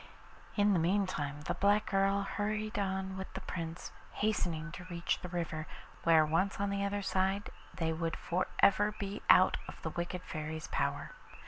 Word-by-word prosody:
In 205 Hz, -1 st, +4 dB
the 180 Hz, -, +3 dB
meantime 165 Hz, -5 st, 0 dB
the -, -, -2 dB
black 205 Hz, +2 st, +3 dB
girl 195 Hz, 0 st, +3 dB
hurried 210 Hz, +1 st, -2 dB
on 190 Hz, -1 st, -2 dB
with 190 Hz, -, -6 dB
the 190 Hz, -, -4 dB
Prince, 165 Hz, -2 st, -5 dB, 0.2 s
hastening 170 Hz, -6 st, -1 dB
to 180 Hz, +1 st, -8 dB
reach 170 Hz, -1 st, -1 dB
the 180 Hz, -, -6 dB
river, 165 Hz, -3 st, -3 dB, 0.4 s
where 160 Hz, -2 st, +6 dB
once 185 Hz, +7 st, +1 dB
on 200 Hz, 0 st, 0 dB
the 200 Hz, 0 st, 0 dB
other 200 Hz, 0 st, -1 dB
side 190 Hz, +2 st, 0 dB, 0.2 s
they 165 Hz, -2 st, 0 dB
would 165 Hz, 0 st, -2 dB
for 180 Hz, +2 st, -1 dB, 0.2 s
ever 205 Hz, +2 st, +5 dB
be 200 Hz, +1 st, -4 dB
out 185 Hz, -, +7 dB
of -, -, -9 dB
the 160 Hz, -, -2 dB
wicked 175 Hz, +2 st, -3 dB
Fairy's 155 Hz, 0 st, -5 dB
power. -, -, -1 dB
185 Hz, 175 wpm, -33 LUFS, 165-200 Hz, 0.4 s, out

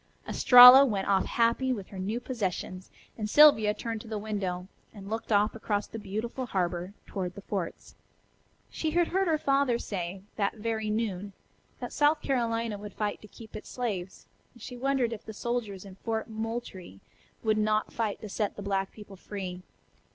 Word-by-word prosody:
Estralla 250 Hz, +2 st, +10 dB
went 205 Hz, -8 st, -1 dB
off 195 Hz, -1 st, +2 dB
happy 235 Hz, +3 st, +1 dB
with 205 Hz, -7 st, -4 dB
her 195 Hz, -, -8 dB
new 210 Hz, +5 st, -2 dB
possessions, 190 Hz, -6 st, -4 dB, 0.3 s
and 210 Hz, -1 st, -2 dB
Sylvia 250 Hz, -7 st, +7 dB
turned 225 Hz, 0 st, -4 dB
to 230 Hz, -, -12 dB
the 220 Hz, -1 st, -4 dB
window, 195 Hz, -4 st, -3 dB, 0.3 s
and 200 Hz, 0 st, -9 dB
looked 225 Hz, +1 st, -4 dB
off 210 Hz, +1 st, +3 dB
across 210 Hz, -2 st, -2 dB
the 225 Hz, -, -8 dB
beautiful 225 Hz, +5 st, -4 dB
harbor 180 Hz, -1 st, -2 dB
toward 180 Hz, -2 st, -4 dB
the 200 Hz, -, -10 dB
forts. 190 Hz, -5 st, -5 dB, 0.8 s
She 315 Hz, -, -2 dB
had 340 Hz, +2 st, +1 dB
heard 385 Hz, +1 st, +1 dB
her 320 Hz, -2 st, +2 dB
father 275 Hz, -4 st, +2 dB
say, 185 Hz, -4 st, -5 dB
that 200 Hz, 0 st, 0 dB
very 220 Hz, 0 st, -2 dB
noon, 205 Hz, -3 st, -2 dB, 0.5 s
that -, -, -6 dB
South 295 Hz, +1 st, +3 dB
Carolina 230 Hz, -5 st, -1 dB
would 205 Hz, -1 st, -9 dB
fight 210 Hz, -1 st, -2 dB
to 210 Hz, -, -12 dB
keep 220 Hz, +1 st, -13 dB
its -, -, -8 dB
slaves, 195 Hz, -7 st, -4 dB, 0.3 s
and 240 Hz, -, -17 dB
she 250 Hz, -, -7 dB
wondered 255 Hz, -2 st, 0 dB
if 215 Hz, -, -8 dB
the 220 Hz, -, -8 dB
soldiers 215 Hz, -4 st, -3 dB
in 195 Hz, -, -10 dB
Fort 225 Hz, 0 st, -3 dB
Moultrie 220 Hz, -, -6 dB, 0.4 s
would 215 Hz, -1 st, +2 dB
not 215 Hz, 0 st, 0 dB
fight 220 Hz, -3 st, -2 dB
to 215 Hz, -, -6 dB
set 205 Hz, +1 st, -2 dB
the 205 Hz, -, -7 dB
black 195 Hz, -1 st, -1 dB
people 205 Hz, -2 st, -12 dB
free. 185 Hz, -2 st, -6 dB
215 Hz, 180 wpm, -28 LUFS, 195-235 Hz, 0.8 s, Estralla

